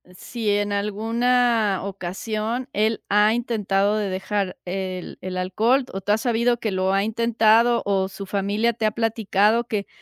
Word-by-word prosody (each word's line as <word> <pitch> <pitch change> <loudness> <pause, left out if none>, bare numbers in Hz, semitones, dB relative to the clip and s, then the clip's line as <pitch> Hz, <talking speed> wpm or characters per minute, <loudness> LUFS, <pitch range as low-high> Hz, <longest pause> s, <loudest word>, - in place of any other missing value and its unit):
¿si 220 +3 -3
en 205 0 0
alguna 225 +1 +1
ocasión 215 +6 -4
él 215 +1 0
ha 210 +2 +4
intentado 210 -3 0
de 205 -2 -1
dejar 190 0 -2
el 185 0 -5
el 185 0 -5
alcohol?, 220 +9 +1
¿O 195 - -5
tú 205 +2 -1
has 220 - +2
sabido 240 0 +1
que 220 -3 -2
lo 190 0 0
ha 195 +1 +2
intentado? 230 +1 +3
¿O 195 -1 0
su 195 0 -8
familia 205 +4 0
te 220 -1 -2
ha 215 - +2
platicado 220 0 +1
que 210 -4 -3
210 Hz, 160 wpm, -23 LUFS, 195-230 Hz, -, ha